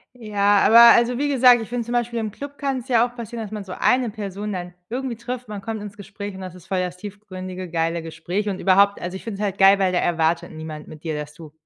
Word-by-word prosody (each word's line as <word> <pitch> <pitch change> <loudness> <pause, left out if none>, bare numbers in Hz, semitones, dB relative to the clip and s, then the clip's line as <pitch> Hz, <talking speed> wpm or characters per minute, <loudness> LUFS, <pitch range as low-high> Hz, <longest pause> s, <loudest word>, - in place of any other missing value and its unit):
Ja, 205 -3 +2
aber 235 +2 +9
also, 240 +1 +2
wie 290 +1 0
gesagt, 250 -3 +6
ich 225 - -7
finde 240 -2 -3
zum 240 - -5
Beispiel 240 -1 -1
im 215 -2 -3
Club 285 +5 -9
kann's 270 -3 -3
ja 240 -2 +4
auch 245 0 -9
passieren, 230 0 -6
dass 210 - -8
man 210 -2 -5
so 185 -1 -8
eine 250 -2 +2
Person 205 0 -5
dann 180 -1 -6 0.2
irgendwie 250 -1 -3
trifft. 250 0 -6
Man 205 -2 -6
kommt 220 0 -5
ins 205 0 -9
Gespräch 200 0 -7
und 190 - -9
das 185 -1 -8
ist 180 +1 -15
voll 190 -1 -1
das 180 0 -3
tiefgründige, 185 -2 -8
geile 165 0 -1
Gespräch. 170 +6 -3
Und 190 - -4
überhaupt 200 +1 +4
also, 180 +2 -5
ich - - -8
finde 205 -3 -6
es - - -2
halt 195 -2 -2
geil, 195 +1 +7
weil 190 -1 +2
da 180 - +1
erwartet 165 -1 0
niemand 155 -1 -8
mit 155 0 -12
dir, 160 -2 -3
dass 150 0 -7
du 155 -1 -12
200 Hz, 265 wpm, -22 LUFS, 180-235 Hz, 0.2 s, aber